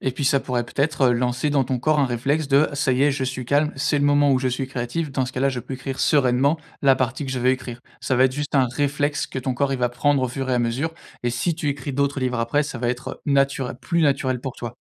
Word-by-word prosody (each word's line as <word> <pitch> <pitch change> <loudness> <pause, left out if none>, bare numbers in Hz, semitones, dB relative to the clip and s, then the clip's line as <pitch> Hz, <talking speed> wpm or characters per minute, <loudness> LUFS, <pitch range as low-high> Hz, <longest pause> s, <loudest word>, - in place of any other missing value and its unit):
Et 130 - -1
puis, 140 - -4
ça 140 0 +3
pourrait 120 -2 -2
peut-être 140 -1 +1
lancer 125 +4 0
dans 140 -2 +3
ton 130 0 -2
corps 155 +4 +2
un 140 - +3
réflexe 140 +5 -1
de: 140 +2 +4
«Ça 140 -2 +1
y 130 +2 +2
est, 145 - +4
je 135 0 -2
suis 130 -1 -4
calme, 145 +4 +2
c'est 145 +1 +1
le 145 - +1
moment 145 -1 +4
où 130 - +3
je 130 0 0
suis 130 +1 -2
créative. 130 +5 -3
Dans 130 -2 0
ce 130 - -7
cas 130 - -4
là, 140 - +3
je 125 -2 -4
peux 130 - -7
écrire 135 +1 -5
sereinement 140 +2 +3 0.2
la 135 -1 +5
partie 130 +2 -2
que - - -4
je 130 - -2
veux 125 +1 +3
écrire». 130 -2 -4 0.2
Ça 130 - 0
va 130 - +5
être 130 - +2
juste 145 +1 -4
un 130 -2 +4
réflexe 145 +1 0
que 130 - -5
ton 130 0 -2
corps, 135 +1 0
il 130 - -2
va 125 -1 +1
prendre 140 +2 +1
au 130 - 0
fur 130 +2 -4
et 125 - +2
à - - +2
mesure. 130 +8 -1 0.3
Et 120 - 0
si 125 +8 -1
tu 155 -3 -3
écris 140 0 -3
d'autres 140 +1 0
livres 125 -2 -1
après, 130 +6 +1
ça 140 -4 -6
va 120 0 -1
être 125 +1 -4
nature 140 -2 +1
plus 170 -1 0
naturel 135 -3 +1
pour 130 -1 -5
toi. 120 0 -6
135 Hz, 285 wpm, -23 LUFS, 125-145 Hz, 0.3 s, la